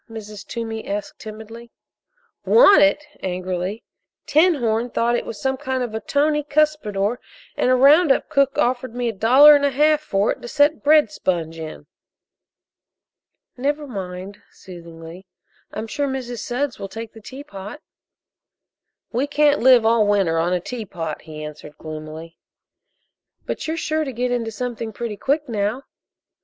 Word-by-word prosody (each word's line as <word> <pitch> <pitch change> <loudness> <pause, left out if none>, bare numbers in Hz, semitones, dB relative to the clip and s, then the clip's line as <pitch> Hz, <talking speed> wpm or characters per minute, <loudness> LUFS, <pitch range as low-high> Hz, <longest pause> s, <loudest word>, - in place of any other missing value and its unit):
Mrs. 215 -2 -9
Toomey 225 -2 -5
asked 205 +1 -5
timidly. 220 +2 -10 0.7
"Want 405 -9 +6
it?" 295 0 +3
angrily. 185 +2 -4 0.4
"'Tinhorn' 245 -8 +2
thought 235 0 +1
it - - -3
was 215 - -7
some 265 0 -1
kind 260 -2 -2
of 235 -3 -5
a 220 - -2
tony 295 +5 +1
cuspidor, 255 -8 0 0.4
and - - +1
a 255 - +5
round 285 +5 +6
up - - +1
cook 275 -3 +1
offered 245 -1 0
me 245 -1 -1
a - - -4
dollar 260 +9 +7
and 285 - +1
a 285 - +3
half 300 +3 +3
for 200 -8 0
it - - -6
to - - -8
set 290 +4 +2
bread 305 +1 +5
sponge 165 - -2
in." 155 -2 -8 1.7
"Never 290 +4 -2
mind," 195 -3 -7
soothingly, 170 0 -12 0.4
"I'm 215 - -5
sure 280 +6 -2
Mrs. 250 -3 -4
Sudds 255 +4 -3
will 195 - -6
take 225 +1 -8
the 225 - -13
teapot." 230 -2 -9 1.3
"We 255 +5 -1
can't 295 0 +3
live 250 -2 +6
all 225 -2 +3
winter 195 -6 +2
on 170 +2 0
a 180 - +1
teapot," 180 -7 -6
he 155 -1 -9
answered 150 0 -10
gloomily. 155 +1 -9 1.1
"But - - -4
you're 320 +1 -2
sure 315 -1 -1
to 275 - -4
get 245 +1 -2
into 235 -2 -1
something 230 -1 -5
pretty 230 -1 -5
quick 290 +6 -1
now." 220 +3 -2
235 Hz, 155 wpm, -21 LUFS, 195-280 Hz, 1.7 s, dollar